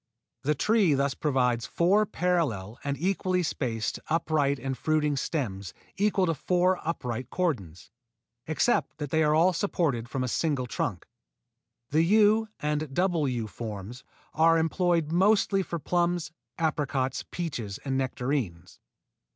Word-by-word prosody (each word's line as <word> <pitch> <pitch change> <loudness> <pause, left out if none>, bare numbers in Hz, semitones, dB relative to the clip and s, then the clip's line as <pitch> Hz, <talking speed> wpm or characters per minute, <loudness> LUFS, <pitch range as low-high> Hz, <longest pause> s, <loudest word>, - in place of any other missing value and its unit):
The 150 +3 +1
tree 205 -3 +3
thus 140 0 +1
provides 125 -5 0
four 200 +5 +3
parallel 150 - -1
and 140 0 -2
equally 185 0 0
spaced 115 -8 -2
upright 155 -3 +1
and 135 +1 -3
fruiting 150 0 +1
stems 100 - -3 0.2
equal 200 -1 +2
to 165 - +1
four 180 +4 +1
upright 130 -6 -3
cordons, 100 - -3 0.6
except 160 +1 +1
that 145 -2 -5
they 160 - +3
are 150 0 +3
all 175 +4 +4
supported 150 - -1
from 130 -1 -2
a - - -1
single 140 0 0
trunk. 120 - -3 0.9
The 155 +3 +4
U 215 +4 +4
and 150 0 -2
double 170 -2 +1
U 120 -3 -2
forms 110 +2 -7 0.3
are 165 +1 +4
employed 165 -1 +1
mostly 195 +2 +3
for 175 -2 -4
plums, 175 0 0 0.3
apricots, 140 -5 -1
peaches 120 - -4
and 135 -1 -1
nectarines. 130 - -2
150 Hz, 135 wpm, -27 LUFS, 130-175 Hz, 0.9 s, all